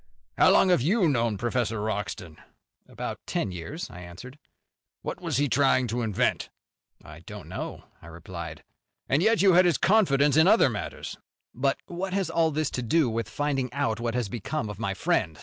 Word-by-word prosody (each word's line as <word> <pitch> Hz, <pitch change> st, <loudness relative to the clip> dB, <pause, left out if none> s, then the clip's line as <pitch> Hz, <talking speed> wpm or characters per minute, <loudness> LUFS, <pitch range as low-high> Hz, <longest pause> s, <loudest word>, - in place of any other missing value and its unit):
"How -, -, +5 dB
long 190 Hz, -, +5 dB
have 180 Hz, -7 st, +4 dB
you 185 Hz, -, +3 dB
known 115 Hz, -7 st, +1 dB
Professor 115 Hz, -1 st, -1 dB
Wroxton?" 105 Hz, -6 st, -4 dB, 0.5 s
"About -, -, -6 dB
ten -, -, -1 dB
years," 90 Hz, -, -6 dB
I 90 Hz, -, -10 dB
answered. 90 Hz, -, -11 dB, 0.6 s
"What -, -, -5 dB
was 165 Hz, -7 st, -1 dB
he 145 Hz, +1 st, +2 dB
trying 135 Hz, -1 st, +3 dB
to 120 Hz, +3 st, -1 dB
invent?" 110 Hz, -4 st, 0 dB, 0.6 s
"I -, -, -11 dB
don't -, -, -10 dB
know," -, -, -6 dB, 0.2 s
I -, -, -13 dB
replied. 85 Hz, 0 st, -8 dB, 0.4 s
"And 140 Hz, +4 st, +2 dB
yet 220 Hz, 0 st, +3 dB
you 195 Hz, -2 st, +6 dB
had 180 Hz, +1 st, +6 dB
his 170 Hz, -6 st, +3 dB
confidence 150 Hz, -9 st, +3 dB
in 160 Hz, +2 st, +6 dB
other 195 Hz, -, +5 dB
matters?" 100 Hz, -, -6 dB, 0.4 s
"But 135 Hz, +2 st, 0 dB
what 185 Hz, +2 st, -5 dB
has 195 Hz, -1 st, -1 dB
all 165 Hz, -1 st, +2 dB
this 155 Hz, -1 st, -1 dB
to 125 Hz, -, -3 dB
do 130 Hz, +1 st, +2 dB
with 115 Hz, -1 st, -3 dB
finding 135 Hz, -3 st, -1 dB
out 130 Hz, -6 st, -1 dB
what 115 Hz, 0 st, -2 dB
has 125 Hz, -4 st, 0 dB
become 110 Hz, +2 st, -4 dB
of 105 Hz, -, -10 dB
my 100 Hz, -3 st, -2 dB
friend?" 105 Hz, -, 0 dB
130 Hz, 185 wpm, -26 LUFS, 110-160 Hz, 0.6 s, you